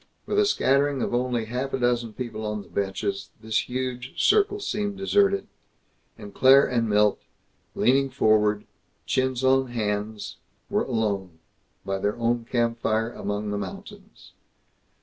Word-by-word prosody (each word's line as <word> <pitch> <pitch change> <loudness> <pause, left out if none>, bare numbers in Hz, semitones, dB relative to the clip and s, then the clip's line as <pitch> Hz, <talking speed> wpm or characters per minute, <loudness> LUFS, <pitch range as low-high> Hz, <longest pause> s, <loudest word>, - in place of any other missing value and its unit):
With 415 - 0
a 415 - +4
scattering 140 - +2
of - - -2
only 120 -2 0
half 125 +4 -4
a - - +1
dozen 120 -2 0
people 115 -2 -5
on 105 -1 -3
the - - -18
benches, 100 0 -3
this 110 -1 -1
huge 125 0 -4
circle 410 -1 +3
seemed 205 - -3
deserted; 195 0 +2 0.7
and 100 -1 -10
Claire 135 +2 +6
and 115 -3 0
Milt, 105 0 +3 0.5
leaning 135 +2 +3
forward, 105 -5 +2 0.4
chins 130 -1 0
on 130 0 +3
hands, 105 -2 -3 0.3
were - - +1
alone 100 -7 -2 0.5
by 95 0 -2
their 105 +2 0
own 120 0 0
campfire, 115 -1 0
among 105 0 -3
the 105 - -2
mountains. 200 - -10
120 Hz, 140 wpm, -25 LUFS, 105-135 Hz, 0.7 s, Claire